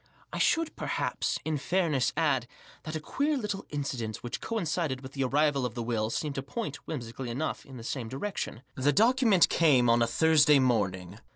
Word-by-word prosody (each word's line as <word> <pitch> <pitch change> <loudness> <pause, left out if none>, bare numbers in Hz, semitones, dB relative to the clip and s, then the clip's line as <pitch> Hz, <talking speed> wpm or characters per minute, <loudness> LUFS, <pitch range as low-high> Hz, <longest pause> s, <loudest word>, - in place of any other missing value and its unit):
I - - -3
should, 330 -1 +2
perhaps, - - -2
in 155 -2 -1
fairness 155 -6 +1
add* 145 -7 +1 0.4
that 155 0 -5
a - - -1
queer 285 - -1
little 210 -5 -4
incident 130 -7 -4
which 120 - -5
coincided 165 - -2
with 130 0 -9
the 135 - -1
arrival 140 +1 +2
of 125 -2 -3
the 120 - -3
will, 110 -2 -1
seemed 145 +5 -2
to 135 - -3
point, 145 - -5
whimsically 125 -3 -5
enough* 135 +7 -3
in 135 -2 -10
the 115 - -9
same 120 -1 -4
direction. 135 - -4
The 140 +2 +1
document 225 -4 +5
came 130 -8 +4
on 120 0 +3
a 115 - +3
Thursday 150 +3 +5
morning. 100 -7 0
140 Hz, 185 wpm, -29 LUFS, 120-160 Hz, 0.4 s, document